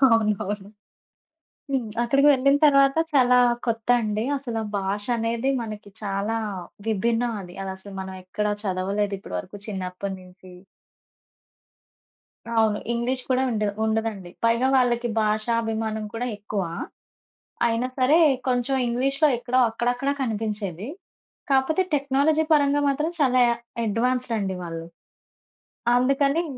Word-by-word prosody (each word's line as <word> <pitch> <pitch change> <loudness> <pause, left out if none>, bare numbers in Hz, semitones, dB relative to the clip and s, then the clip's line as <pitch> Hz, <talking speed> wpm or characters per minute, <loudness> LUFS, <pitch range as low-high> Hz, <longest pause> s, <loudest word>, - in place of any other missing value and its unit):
అవునవును. 210 -2 0 1.0
హ్మ్. 255 -5 -1
అక్కడికి 275 +4 +3
వెళ్ళిన 275 +1 +4
తర్వాత 275 0 +5 0.2
చాలా 250 -2 +5 0.3
కొత్త 225 0 -2
అండి. 215 0 -1
అసలు 235 -5 -4 0.2
భాషనేది 230 +5 -1
మనకి 215 -2 -8
చాలా 200 +2 -1 0.5
విభిన్నం 230 +3 +1
అది. 175 -1 -11
అదసలు 190 +1 -7
మనం 190 0 -6
ఎక్కడ 210 +3 -2 0.2
చదవలేదు 200 +1 -1
ఇప్పుడు 90 - -6
వరుకు 205 - -8
చిన్నప్పడు 190 -1 -4
నించి. 185 0 -15 2.0
అవును. 220 -2 +3
ఇంగ్లీష్ 245 +2 -1
కూడా 260 0 +3
ఉండ్ 215 -2 0 0.2
ఉండదండి. 220 -4 -2
పైగా 235 +3 +3
వాళ్ళకి 240 -1 +2
భాషాభిమానం 220 0 -1
కూడా 240 +2 -2
ఎక్కువా. 200 -4 -3 1.0
అయినా 235 +2 +1
సరే 265 +5 +5 0.3
కొంచెం 250 +1 +1
ఇంగ్లీష్‌లో 275 +5 +2
ఎక్కడో 245 +2 0
అక్కడక్కడ 245 +4 -1
కనిపించేది. 210 -5 -3 0.6
కాపోతే 275 +7 +3
టెక్నాలజీ 285 +2 +2
పరంగా 290 -1 +3
మాత్రం 300 +4 0
చాలా 255 -3 +4 0.4
అడ్‌వా‌న్స్‌డండి 230 -3 0
వాళ్ళు. 165 -1 -6 1.1
అందుకని 275 +5 +2
230 Hz, 105 wpm, -24 LUFS, 205-255 Hz, 2.0 s, తర్వాత